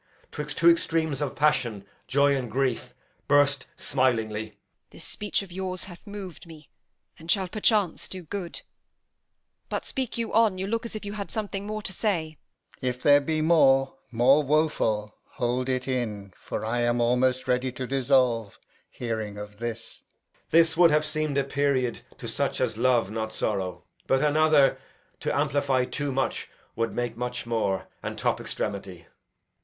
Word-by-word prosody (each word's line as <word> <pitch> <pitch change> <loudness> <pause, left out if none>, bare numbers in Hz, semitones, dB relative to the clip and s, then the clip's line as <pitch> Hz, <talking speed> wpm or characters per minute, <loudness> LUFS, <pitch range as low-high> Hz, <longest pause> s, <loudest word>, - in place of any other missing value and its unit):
'Twixt 150 0 -5
two 170 - +4
extremes 165 -3 +3
of 145 - -2
passion, 125 -9 +1 0.2
joy 140 +2 +4
and 125 -3 -3
grief, 130 0 -1 0.3
Burst 145 0 +3
smilingly. 110 -5 0
Edm. 105 - -28 0.3
This - - -11
speech 205 -1 -1
of 190 - -12
yours 185 0 -3
hath 180 +2 -11
mov'd 195 -5 -8
me, 155 -3 -14 0.5
And 165 +1 -12
shall 190 -1 +2
perchance 210 -2 +1
do 185 -1 -6
good; 175 +1 -5 1.1
but - - -3
speak 260 -3 -3
you 230 -1 -2
on; 220 -4 +4
You 190 - -2
look 230 +3 -2
as 220 - -5
you 200 - -4
had 205 -2 -5
something 205 -2 -3
more 215 0 -4
to 190 - -3
say. 165 -7 -1
Alb. - - -32
If 125 0 -2
there 145 0 +7
be 155 +2 -1
more, 135 -5 +4 0.2
more 125 +5 +5
woful, 135 -8 +1 0.2
hold 125 0 -1
it 130 0 -1
in; 105 -7 -3
For - - -5
I 120 +2 0
am 120 0 +2
almost 125 +2 +2
ready 125 +1 +1
to 130 0 -4
dissolve, 125 -5 +2 0.3
Hearing 110 -3 -4
of 105 0 -9
this. 120 -1 -5
Edg. - - -38
This 165 0 +5
would 170 0 +7
have 150 0 +3
seem'd 155 -1 -1
a 140 - +3
period 135 -3 0 0.2
To - - -7
such - - -1
as - - 0
love 120 -3 +2
not 110 0 -3
sorrow; 95 -5 -2 0.2
but 135 +2 +3
another, 150 -2 +4 0.4
To - - -1
amplify 140 -3 +2
too 145 +2 -3
much, 135 0 -1 0.3
would 115 0 0
make 120 -2 -2
much 125 +1 -4
more, 110 -5 -1
And - - -5
top - - 0
extremity. 95 -4 -4
135 Hz, 165 wpm, -26 LUFS, 120-165 Hz, 1.1 s, there